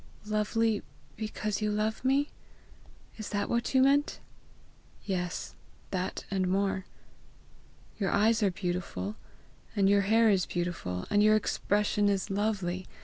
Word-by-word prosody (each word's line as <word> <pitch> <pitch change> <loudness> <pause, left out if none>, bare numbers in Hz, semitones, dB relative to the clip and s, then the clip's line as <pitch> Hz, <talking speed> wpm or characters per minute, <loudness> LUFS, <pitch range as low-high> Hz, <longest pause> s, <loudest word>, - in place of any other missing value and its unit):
"Lovely 215 +1 +1 0.3
because 215 -1 -3
you 210 - +1
love 215 +2 -1
me? 275 +3 +2 0.9
Is 215 - -5
that 205 -1 -1
what 235 +3 -1
you 260 - +6
meant?" 285 +2 +3 0.9
"Yes, 180 -2 -3 0.4
that 185 -1 -3
and 190 -2 +1
more. 190 0 0 1.1
Your 195 - +1
eyes 225 +2 +3
are 205 - +4
beautiful, 175 - -3 0.6
and 195 -1 +3
your 200 0 +5
hair 220 +2 +4
is 190 -3 +2
beautiful, 170 - -3
and 205 0 +4
your 215 +1 +6
expression 210 -1 +1
is 195 -1 -1
lovely. 195 -3 -1
205 Hz, 130 wpm, -30 LUFS, 185-215 Hz, 1.1 s, you